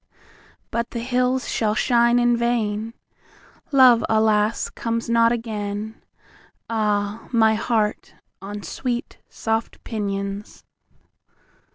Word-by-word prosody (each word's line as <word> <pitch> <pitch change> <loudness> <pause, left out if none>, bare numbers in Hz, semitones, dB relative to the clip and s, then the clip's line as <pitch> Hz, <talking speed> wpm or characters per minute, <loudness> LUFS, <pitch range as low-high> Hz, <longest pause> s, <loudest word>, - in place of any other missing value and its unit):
But 235 0 -2
the 235 - -5
hills 250 +1 0
shall 215 -2 0
shine 235 +1 +3
in 240 0 +3
vain, 230 -1 -1 0.8
Love, 255 -4 +6
alas, 215 0 +2
comes 230 0 -3
not 230 0 +4
again, 215 -2 -4 0.7
Ah, 210 -1 -1
my 220 -2 +4
heart, 215 -1 -1 0.3
on 205 +1 -7
sweet 245 +7 -4
soft 225 0 -3
pinions! 200 -2 -4
225 Hz, 95 wpm, -22 LUFS, 210-235 Hz, 0.8 s, Love